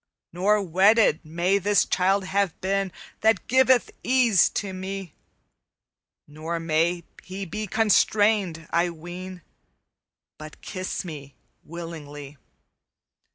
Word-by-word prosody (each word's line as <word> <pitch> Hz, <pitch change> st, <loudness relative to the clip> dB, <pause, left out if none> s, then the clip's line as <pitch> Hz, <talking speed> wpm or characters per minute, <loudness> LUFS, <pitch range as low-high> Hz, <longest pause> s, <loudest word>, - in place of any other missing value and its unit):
"'Nor 200 Hz, +4 st, +2 dB
wedded 195 Hz, 0 st, +4 dB
may 175 Hz, +5 st, 0 dB
this 205 Hz, +2 st, +2 dB
childe 195 Hz, +2 st, +1 dB
have 195 Hz, -2 st, -1 dB
been 195 Hz, 0 st, -1 dB, 0.3 s
That 220 Hz, -2 st, +2 dB
giveth 260 Hz, 0 st, +3 dB
ease 245 Hz, -7 st, +4 dB
to 195 Hz, -2 st, -3 dB
me; 190 Hz, -1 st, -6 dB, 1.1 s
Nor 160 Hz, +3 st, -5 dB
may 165 Hz, +2 st, 0 dB, 0.2 s
he 190 Hz, +1 st, -7 dB
be 210 Hz, +5 st, -5 dB
constrained, 205 Hz, -5 st, +2 dB
I 170 Hz, +1 st, +2 dB
ween, 175 Hz, +2 st, -9 dB, 1.0 s
But 155 Hz, 0 st, -11 dB
kiss 185 Hz, 0 st, -5 dB
me 145 Hz, -5 st, -9 dB, 0.3 s
willingly. 150 Hz, -4 st, -9 dB
185 Hz, 105 wpm, -24 LUFS, 165-200 Hz, 1.1 s, wedded